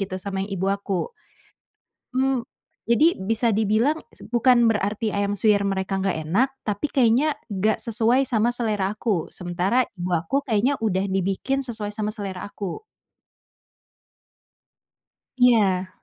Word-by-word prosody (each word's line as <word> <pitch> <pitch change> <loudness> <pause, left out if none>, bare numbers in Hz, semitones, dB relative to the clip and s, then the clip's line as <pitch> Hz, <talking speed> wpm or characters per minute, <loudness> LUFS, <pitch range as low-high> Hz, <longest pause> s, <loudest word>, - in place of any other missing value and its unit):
gitu 185 -1 -3
sama 190 +1 -4
yang 195 +2 -4
ibu 190 +2 -1
aku. 200 - -3 1.0
Mmm, 260 -2 +1 0.4
jadi 300 +9 +3
bisa 225 +5 0
dibilang 220 +8 +2 0.2
s - - -20
bukan 240 0 +4
berarti 210 +1 0
ayam 200 0 0
suwir 205 0 +2
mereka 195 0 -1
nggak 190 -4 -1
enak, 240 +10 +3
tapi 210 +7 -3
kayaknya 260 +4 +3 0.2
nggak 210 +2 0
sesuai 235 +3 +1
sama 235 -1 +2
selera 210 -5 -1
aku. 210 -6 -2
Sementara 185 +8 0
ibu 180 0 -4
aku 175 - 0
kayaknya 245 +4 +1
udah 190 -2 +1
dibikin 195 +9 -1
sesuai 220 -4 -5
sama 210 0 -2
selera 195 -4 -6
aku. 205 - -6 2.5
Iya. 205 -7 +3
210 Hz, 130 wpm, -24 LUFS, 195-240 Hz, 2.5 s, bukan